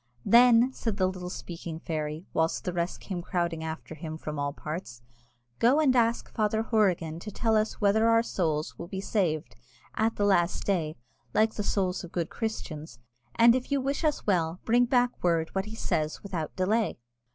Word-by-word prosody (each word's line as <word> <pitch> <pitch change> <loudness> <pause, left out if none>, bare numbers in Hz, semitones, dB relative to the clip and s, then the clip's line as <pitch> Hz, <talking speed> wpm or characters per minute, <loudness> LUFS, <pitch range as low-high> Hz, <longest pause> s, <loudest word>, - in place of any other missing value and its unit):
"Then," 240 +3 +6
said 225 -5 -3
the 190 - +3
little 185 -1 -3
speaking 170 -2 -7
fairy, 155 0 -4
whilst 160 0 0
the 180 - -3
rest 175 +1 -2
came 185 -3 -5
crowding 170 -2 -2
after 160 0 -6
him 155 0 -6
from 150 -2 -5
all 145 0 -1
parts, 150 -5 -7 0.6
"go 250 +6 +4
and 275 -5 +4
ask 235 -1 +2
Father 220 0 +1
Horrigan 180 -8 +1
to 210 - -7
tell 220 +2 0
us 215 0 0
whether 220 +2 +3
our 230 0 +4
souls 155 -8 -2
will 170 - -6
be 190 +1 -5
saved 155 - -1 0.4
at 225 +1 +1
the 205 - +1
last 180 -3 +2
day, 165 -6 0 0.4
like 220 0 +3
the - - -3
souls 195 -3 -1
of 175 - -9
good 170 -2 -2
Christians; 160 - -5 0.4
and 235 0 +7
if 255 +2 -2
you 280 - +2
wish 275 +4 -2
us 305 -2 0
well, 175 -3 +1
bring 240 +2 +4
back 245 0 +3
word 165 -2 +1
what 190 0 -1
he 215 +1 -8
says 155 -7 -2
without 175 -6 -4
delay." 215 +4 +1
185 Hz, 185 wpm, -28 LUFS, 160-225 Hz, 0.6 s, and